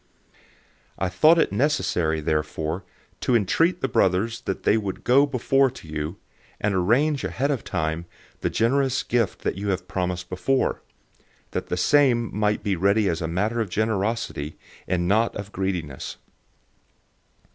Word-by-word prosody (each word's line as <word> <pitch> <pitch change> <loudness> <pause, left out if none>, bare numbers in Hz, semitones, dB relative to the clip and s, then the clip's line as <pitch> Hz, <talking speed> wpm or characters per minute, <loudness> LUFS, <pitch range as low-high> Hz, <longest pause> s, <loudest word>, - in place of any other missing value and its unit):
009:005 - - -30 0.6
I 95 - -1
thought 155 - +5
it 165 - +2
necessary 95 - +1
therefore 80 +3 -2 0.4
to 125 - +1
entreat 165 - +2
the - - +1
brothers 115 +2 +1
that 95 - -3
they - - +4
would 100 -4 -3
go 135 +4 +5
before 135 0 +2
to 125 -9 -12
you, 75 +4 -4 0.4
and 105 -1 0
arrange 125 +11 +2
ahead 140 +3 -1
of 135 -6 -2
time 80 +2 -2 0.3
the - - -1
generous 130 +3 +1
gift 115 -6 -1
that 95 - -2
you 100 -2 0
promised 90 -1 -3
before, 110 +9 0 0.7
that - - -3
the 90 - -2
same 120 0 +3
might 105 0 +1
be 100 -2 0
ready 100 +4 +2
as 85 -1 -1
a 80 - -1
matter 105 +8 0
of 110 - -3
generosity, 110 -6 -1 0.3
and 85 -1 0
not 110 +4 +2
of 100 0 -6
greediness. 90 -8 -3
100 Hz, 150 wpm, -24 LUFS, 90-120 Hz, 0.7 s, thought